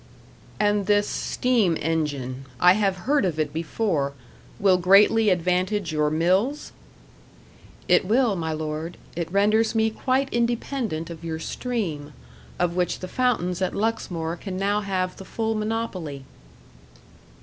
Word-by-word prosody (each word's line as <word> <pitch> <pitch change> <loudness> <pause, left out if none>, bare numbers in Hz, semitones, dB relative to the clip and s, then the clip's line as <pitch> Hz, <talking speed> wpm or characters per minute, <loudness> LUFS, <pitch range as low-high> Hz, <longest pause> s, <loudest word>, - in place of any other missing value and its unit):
"And 205 -1 +1
this 205 0 +3
steam 225 -10 +1
engine 145 -5 -2
I 180 0 +7
have 195 -3 -1
heard 290 +2 +3
of 170 -5 -1
it 150 -2 -1
before 160 -3 -1 0.5
will 190 -3 +4
greatly 205 +4 +5
advantage 180 +1 0
your 150 -1 +1
mills?" 185 - +1 1.2
"It - - +5
will, 230 +1 +2
my 160 -2 -2
lord. 155 +2 -4 0.2
It 170 -1 -3
renders 215 +3 +2
me 220 0 +2
quite 260 +4 0
independent 235 - -1
of 165 0 -9
your 160 -1 -3
stream, 160 - -4 0.4
of 175 -1 0
which 180 -1 0
the 185 - -4
fountains 185 -6 0
at 185 - -1
Luxmore 175 -6 -2
can 185 +1 -6
now 200 +2 +1
have 185 -2 -2
the - - -9
full 225 +3 -2
monopoly." 210 -10 -3
185 Hz, 135 wpm, -24 LUFS, 165-220 Hz, 1.2 s, I